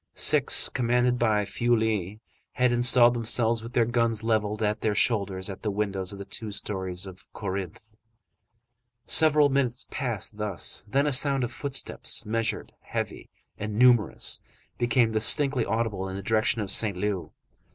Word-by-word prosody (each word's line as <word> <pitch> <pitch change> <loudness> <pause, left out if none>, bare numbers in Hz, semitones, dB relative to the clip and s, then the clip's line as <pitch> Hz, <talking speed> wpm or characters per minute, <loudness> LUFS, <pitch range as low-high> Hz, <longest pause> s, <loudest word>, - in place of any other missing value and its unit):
Six, - - +3
commanded 125 0 +1
by 105 -3 +2
Feuilly, 110 -2 -1 0.3
had 125 -1 +2
installed 120 0 +5
themselves, 115 -1 0
with 115 +2 -9
their 120 -2 +3
guns 115 -2 0
levelled 110 -1 0
at 105 +1 -1
their 105 -2 0
shoulders, 100 -5 +1
at 95 -2 -7
the 110 - -2
windows 100 -2 -2
of 100 - -8
the 100 - -8
two 105 +2 -5
stories 95 -3 -3
of 95 -1 -13
Corinthe. 100 0 -5 1.2
Several 150 -2 +4
minutes 135 -3 -1
passed 115 -5 -1
thus, 105 -4 -2
then 135 +7 +1
a 145 - 0
sound 135 0 +2
of 120 - -3
footsteps, 135 +2 -2
measured, 110 0 -2
heavy, - - -5 0.3
and 105 0 -4
numerous, 120 -3 +3 0.4
became 120 -1 +2
distinctly 130 +3 +2
audible 105 -4 -2
in 95 - -6
the 100 - -6
direction 110 +2 +1
of 100 -2 -3
Saint 100 -4 0
Leu. 100 -1 -3
110 Hz, 150 wpm, -26 LUFS, 100-120 Hz, 1.2 s, installed